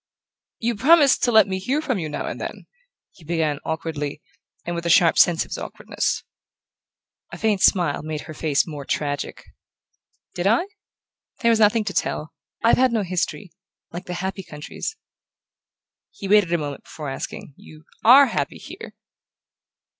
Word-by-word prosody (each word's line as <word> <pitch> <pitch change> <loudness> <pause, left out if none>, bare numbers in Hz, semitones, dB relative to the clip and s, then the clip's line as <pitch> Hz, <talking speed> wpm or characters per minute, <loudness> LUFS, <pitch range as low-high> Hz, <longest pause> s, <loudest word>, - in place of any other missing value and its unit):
"You 235 +1 -1
promised 285 +4 +5
to 240 - +2
let 220 -2 +6
me 190 -1 -2
hear 260 +10 0
from 260 -9 -1
you 155 -3 -4
now 150 - -4
and - - -5
then," - - -6 0.5
he 175 - -19
began 155 -3 -1
awkwardly, 150 -3 -4 0.5
and 175 - -3
with 170 0 -3
a - - 0
sharp 165 0 +5
sense 170 -2 +4
of - - -18
his - - -4
awkwardness. - - -3 1.1
A - - -7
faint 215 -4 +1
smile 175 -6 +3
made 155 -1 -5
her 155 - -9
face 150 -2 +1
more 150 -4 -7
tragic. 145 +1 -3 0.9
"Did 180 +1 -1
I? 230 - +3 0.8
There 235 -2 +4
was 225 - +3
nothing 215 +1 +4
to 200 -2 -4
tell. 155 -2 -2 0.3
I've 230 - +5
had 255 -1 +4
no 220 -3 0
history 185 +1 -3 0.4
like 175 +2 -7
the 180 - -4
happy 190 +2 -4
countries..." 155 - -7 1.1
He 195 - -8
waited 205 -3 +4
a 170 - +3
moment 145 -3 -6
before 150 -3 -7
asking: 135 - -7
"You 155 0 -16 0.2
ARE 265 +5 +9
happy - - -2
here?" - - -10
180 Hz, 165 wpm, -23 LUFS, 155-220 Hz, 1.1 s, ARE